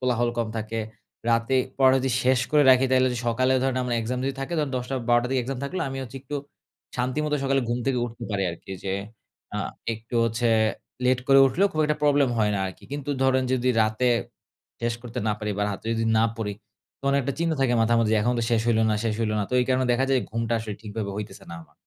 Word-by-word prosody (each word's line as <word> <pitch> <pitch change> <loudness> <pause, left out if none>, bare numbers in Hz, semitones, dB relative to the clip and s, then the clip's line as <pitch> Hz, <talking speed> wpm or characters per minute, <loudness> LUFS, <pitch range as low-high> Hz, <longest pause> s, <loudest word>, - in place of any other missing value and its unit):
কোলাহল 120 -2 +1
কম 115 -2 0
থাকে। 110 +1 -3 0.5
রাতে 115 +3 +2 0.2
পড়া 130 -1 +6
যদি 130 0 -1
শেষ 130 0 +3
করে 150 -1 +5
রাখি, 130 +1 +5
তাহলে 130 0 +4
যদি 125 - -3
সকালে 130 +3 +2
ধরেন 130 -1 0
আমার 125 -1 -1
এক্সাম 125 +3 -2
যদি 135 0 -1
থাকে, 135 +6 -4
তখন 145 -3 0
১০ঃ০০ 125 +2 -3
১২ঃ০০ 120 0 +4
র - - -6
দিকে 130 -1 +2
এক্সাম 130 +1 -4
থাকলে 185 +7 -3
আমি 135 0 -5
হচ্ছে 125 +1 -9
একটু 145 +2 -7 0.6
শান্তিমতো 150 +5 0
সকালে 135 0 +2
ঘুম 120 +1 0
থেকে 130 -2 +1
উঠতে 115 -1 -7
পারি 100 -1 0
আরকি। 85 +3 -11
যে 95 - -1 0.6
আ - - -1 0.3
একটু 115 +2 -8
হচ্ছে 115 +1 0 0.6
লেট 125 0 +3
করে 135 - +7
উঠলেও 180 +10 +2
খুব 155 - 0
একটা 150 0 +1
প্রবলেম 145 -2 +4
হয় 105 -1 +3
না - - 0
আরকি। 95 - -9
কিন্তু 145 0 -4
ধরেন 130 0 +3
যদি 130 0 +1
রাতে 110 +3 +1 0.7
শেষ 115 0 0
করতে 125 +1 -6
না 105 - +2
পারি, 105 -1 -3
বা - - +1
রাতে 100 +3 -7
যদি 115 0 0
না 115 - +4
পড়ি, 105 -2 -3 0.5
তখন 140 0 0
একটা 140 +1 -2
চিন্তা 165 -1 +1
থাকে 125 -2 +3
মাথার 115 +1 +3
মধ্যে 110 -1 +2
এখন 120 +3 +1
তো 115 - 0
শেষ 115 -2 +3
হইল 115 -2 +3
না, - - +2
শেষ 110 -2 0
হইল 110 -1 0
না। 105 - 0
তো 125 - -1
এই 125 - +2
কারণে 130 0 +2
দেখা 130 +2 +2
যায় 130 -2 +3
ঘুমটা 115 +1 -2
আসলে 110 -2 -5
ঠিকভাবে 105 -1 -4
হইতেছে 105 -2 -7
না 85 - -6
আমার। 75 -2 -23
125 Hz, 235 wpm, -25 LUFS, 115-135 Hz, 0.7 s, করে